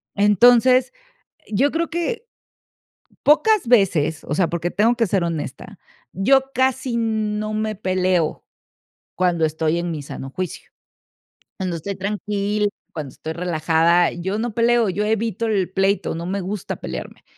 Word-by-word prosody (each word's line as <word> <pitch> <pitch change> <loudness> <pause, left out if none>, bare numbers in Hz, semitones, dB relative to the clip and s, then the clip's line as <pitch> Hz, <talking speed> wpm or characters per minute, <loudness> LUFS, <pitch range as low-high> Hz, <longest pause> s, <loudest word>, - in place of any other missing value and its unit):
Entonces, 245 +5 +5 0.6
yo 260 +7 +1
creo 330 0 -2
que 445 +8 -3 1.0
pocas 360 - +4
veces, 170 -9 +2
o 145 - -4
sea, 170 +1 +2
porque 170 +1 -2
tengo 230 +4 +2
que 230 -3 +1
ser 185 -2 +1
honesta, 160 -6 -5 0.4
yo 270 +7 +2
casi 260 -1 0
no 215 -1 -1
me 215 0 -2
peleo 185 -4 0 0.7
cuando 175 -3 +2
estoy 160 +2 0
en 175 0 -3
mi 150 -2 -4
sano 135 -1 -7
juicio. 185 +2 -5 0.9
Cuando 185 -3 -3
estoy 195 +5 -5
tranquila, 205 +1 -1 0.2
cuando 145 -5 -6
estoy 160 - -6
relajada, 170 0 +2
yo 190 +4 -3
no 235 0 -2
peleo, 235 -3 +3
yo 205 +3 -1
evito 220 0 -1
el 195 -4 0
pleito, 195 -1 +1
no 170 +1 -5
me 195 +2 -2
gusta 195 +1 -4
pelearme. - - -7
200 Hz, 140 wpm, -21 LUFS, 175-230 Hz, 1.0 s, Entonces